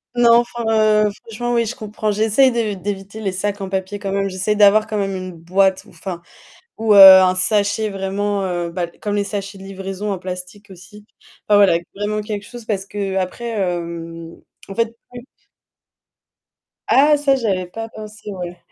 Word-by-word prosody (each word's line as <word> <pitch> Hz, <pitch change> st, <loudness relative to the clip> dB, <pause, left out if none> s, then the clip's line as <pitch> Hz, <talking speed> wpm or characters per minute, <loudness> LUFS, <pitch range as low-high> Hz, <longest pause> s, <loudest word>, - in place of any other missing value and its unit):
Non, 235 Hz, -1 st, +6 dB
enfin, 240 Hz, 0 st, -4 dB, 0.4 s
heu, 205 Hz, -, 0 dB
franchement 240 Hz, +2 st, -4 dB
oui, 230 Hz, -1 st, +1 dB
je 245 Hz, -, -4 dB
comprends. 215 Hz, 0 st, -3 dB
J'essaie 220 Hz, +5 st, +3 dB
d'é 230 Hz, -4 st, -1 dB
d'éviter 195 Hz, +2 st, -6 dB
les 195 Hz, -3 st, -1 dB
sacs 200 Hz, +2 st, -3 dB
en 190 Hz, -, -4 dB
papier 190 Hz, +1 st, -3 dB
quand 195 Hz, -1 st, -4 dB
même. 195 Hz, 0 st, 0 dB
J'essaie 190 Hz, +3 st, -1 dB
d'avoir 210 Hz, +1 st, +5 dB
quand 215 Hz, -, -3 dB
même 195 Hz, -1 st, -2 dB
une 185 Hz, 0 st, -6 dB
boîte 185 Hz, +3 st, +1 dB
ou -, -, -18 dB
enfin 175 Hz, -3 st, -7 dB, 0.6 s
ou 220 Hz, -2 st, +3 dB
heu, -, -, +7 dB
un 190 Hz, -1 st, +9 dB
sachet 205 Hz, +3 st, +1 dB
vraiment 195 Hz, +1 st, -2 dB
heu, 175 Hz, -2 st, -3 dB
bah 175 Hz, -1 st, -3 dB
comme 205 Hz, -1 st, -2 dB
les 205 Hz, -, +1 dB
sachets 200 Hz, -1 st, -6 dB
de -, -, -11 dB
livraison 195 Hz, +1 st, -5 dB
en 190 Hz, -, -2 dB
plastique 185 Hz, +3 st, -8 dB
aussi. 190 Hz, +4 st, -14 dB, 0.4 s
Enfin 205 Hz, -1 st, +5 dB
voilà, 195 Hz, -4 st, +5 dB, 0.2 s
vraiment 210 Hz, +1 st, -2 dB
quelque 210 Hz, -1 st, -5 dB
chose 240 Hz, -2 st, -11 dB
parce 195 Hz, -3 st, -2 dB
qu'après, 195 Hz, +3 st, -3 dB
hem, 170 Hz, -4 st, -4 dB, 0.3 s
en 195 Hz, -, -7 dB
fait, 230 Hz, +1 st, -1 dB, 0.2 s
plus 245 Hz, 0 st, -10 dB, 1.6 s
Ah! 295 Hz, +2 st, +5 dB
Ça 280 Hz, -2 st, +2 dB
j'avais 195 Hz, -7 st, -1 dB
pas 225 Hz, +5 st, -7 dB
pensé, 215 Hz, -1 st, -10 dB
ouais. 180 Hz, -1 st, -7 dB
200 Hz, 180 wpm, -19 LUFS, 190-215 Hz, 1.6 s, un